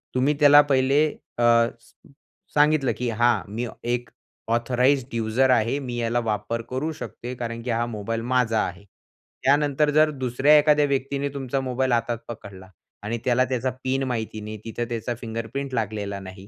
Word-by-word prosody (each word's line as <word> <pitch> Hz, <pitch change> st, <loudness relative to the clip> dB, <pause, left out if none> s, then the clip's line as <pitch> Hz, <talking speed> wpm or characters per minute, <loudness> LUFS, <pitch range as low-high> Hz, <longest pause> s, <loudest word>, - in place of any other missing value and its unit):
तुम्ही 130 Hz, +4 st, +3 dB
त्याला 145 Hz, 0 st, +8 dB
पहिले 135 Hz, +3 st, +3 dB, 0.3 s
अ, 120 Hz, -, 0 dB, 0.4 s
स -, -, -23 dB, 0.6 s
सांगितलं, 150 Hz, -2 st, +3 dB
की 125 Hz, -1 st, -2 dB
हां, 120 Hz, +2 st, +2 dB
मी 120 Hz, +2 st, -2 dB, 0.3 s
एक 120 Hz, 0 st, -2 dB, 0.4 s
ऑथराइज्ड 125 Hz, +2 st, +1 dB
यूजर 115 Hz, +4 st, +1 dB
आहे, 120 Hz, +1 st, +2 dB
मी 125 Hz, -3 st, -5 dB
याला 120 Hz, 0 st, 0 dB
वापर 110 Hz, 0 st, -2 dB
करू 135 Hz, +5 st, -2 dB
शकते, 125 Hz, -5 st, -7 dB
कारण 115 Hz, -1 st, -5 dB
की 125 Hz, -, -5 dB
हा 115 Hz, +1 st, 0 dB
मोबाईल 115 Hz, 0 st, -4 dB
माझा 115 Hz, -3 st, +2 dB
आहे. 90 Hz, +3 st, -8 dB, 0.6 s
त्यानंतर 145 Hz, +1 st, +3 dB
जर 155 Hz, +1 st, +4 dB
दुसऱ्या 135 Hz, +2 st, +3 dB
एखाद्या 150 Hz, 0 st, +4 dB
व्यक्तीने 140 Hz, 0 st, -1 dB
तुमचा 135 Hz, -1 st, -2 dB
मोबाईल 130 Hz, 0 st, -1 dB
हातात 115 Hz, 0 st, 0 dB
पकडला 100 Hz, -5 st, -10 dB, 0.3 s
आणि 115 Hz, +3 st, -2 dB
त्याला 125 Hz, 0 st, +3 dB
त्याचा 130 Hz, 0 st, -1 dB
पिन 135 Hz, +1 st, 0 dB
माहिती 110 Hz, -3 st, -3 dB
नाही, 105 Hz, +1 st, -7 dB
तिथं 115 Hz, +1 st, -3 dB
त्याचा 120 Hz, +1 st, -3 dB
फिंगरप्रिंट 115 Hz, +4 st, -5 dB
लागलेला 105 Hz, -3 st, -2 dB
नाही, 95 Hz, 0 st, -11 dB
120 Hz, 160 wpm, -24 LUFS, 115-135 Hz, 0.6 s, त्याला